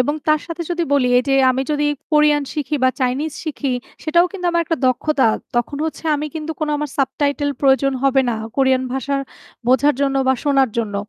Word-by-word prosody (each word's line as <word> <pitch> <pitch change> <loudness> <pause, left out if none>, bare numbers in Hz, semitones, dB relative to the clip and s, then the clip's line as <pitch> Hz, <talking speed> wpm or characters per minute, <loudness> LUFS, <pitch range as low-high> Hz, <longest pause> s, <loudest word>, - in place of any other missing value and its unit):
এবং 290 +4 +1
তার 305 0 +4
সাথে 335 0 -5
যদি 345 0 0
বলি, 280 -3 +3
এই - - +1
যে 270 - +3 0.2
আমি 260 +1 0
যদি 295 0 0 0.3
কোরিয়ান 300 -1 +4
শিখি 300 -1 -2
বা - - +6
চাইনিজ 265 +5 -1
শিখি, 300 -3 -3 0.4
সেটাও 340 +3 +3
কিন্তু 365 -3 -4
আমার 340 0 +1
একটা 330 +1 -1
দক্ষতা। 270 +2 +1 0.3
তখন 240 +4 -1
হচ্ছে 320 - -7
আমি 295 +1 -3
কিন্তু 320 0 -4
কোন 310 - -1
আমার 295 -1 -4
সাবটাইটেল 285 +1 0
প্রয়োজন 275 0 +3
হবে 270 0 +4
না - - -1 0.2
কোরিয়ান 265 -1 +3
ভাষা 270 +1 -2 0.5
বোঝার 265 +3 +4
জন্য 275 -1 +1
বা 265 - +4
শোনার 275 -3 +3
জন্য। 210 -3 -2
285 Hz, 195 wpm, -19 LUFS, 265-305 Hz, 0.5 s, বা